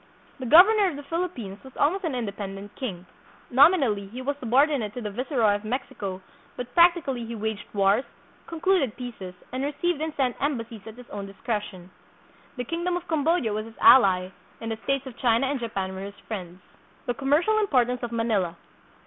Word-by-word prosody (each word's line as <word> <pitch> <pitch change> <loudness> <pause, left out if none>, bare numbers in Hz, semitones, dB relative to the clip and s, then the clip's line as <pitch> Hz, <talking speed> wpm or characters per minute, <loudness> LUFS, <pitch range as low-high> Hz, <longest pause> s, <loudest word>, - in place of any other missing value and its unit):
The 255 - -4
governor 390 - +7
of 325 - -6
the 290 - -8
Philippines 280 - -4
was 265 -1 -13
almost 365 +6 +1
an 305 -5 -1
inde 220 -5 -3
pendent 200 0 -7
king. 190 -10 -5 0.5
Nominally, 260 - +4
he 235 +6 -8
was 285 +2 -1
subordinate 255 -3 +2
to 245 - -4
the 210 -2 -4
viceroy 240 -2 +1
of 205 +1 -3
Mexico, 205 -5 -4 0.3
but 245 0 -6
practically 335 -8 +4
he 230 0 -6
waged 220 -1 -4
wars, 200 +4 +3 0.4
con 330 -1 -7
cluded 355 - +2
peaces, 225 -8 -7 0.2
and 255 +1 -3
received 295 +3 -1
and 315 0 -1
sent 255 -3 0
embassies 230 -7 -3
at 220 - -9
his 250 -1 -12
own 200 -1 -5
discretion. 195 -3 -5 0.7
The 250 - -2
kingdom 345 +6 -2
of 355 0 -8
Cambodia 315 -6 +1
was 215 +1 -3
his 225 - -14
ally, 185 -7 +6 0.3
and 225 0 -5
the 220 - -3
states 275 0 0
of 255 -3 -9
China 235 +1 +3
and 275 0 -1
Japan 195 -5 -3
were 190 - -6
his 200 +1 -8
friends. 185 -4 -6 0.4
The 245 - 0
Commercial 295 - +2
Importance 250 - +1
of 240 -1 -4
Manila. 215 -7 0
245 Hz, 185 wpm, -26 LUFS, 205-285 Hz, 0.7 s, governor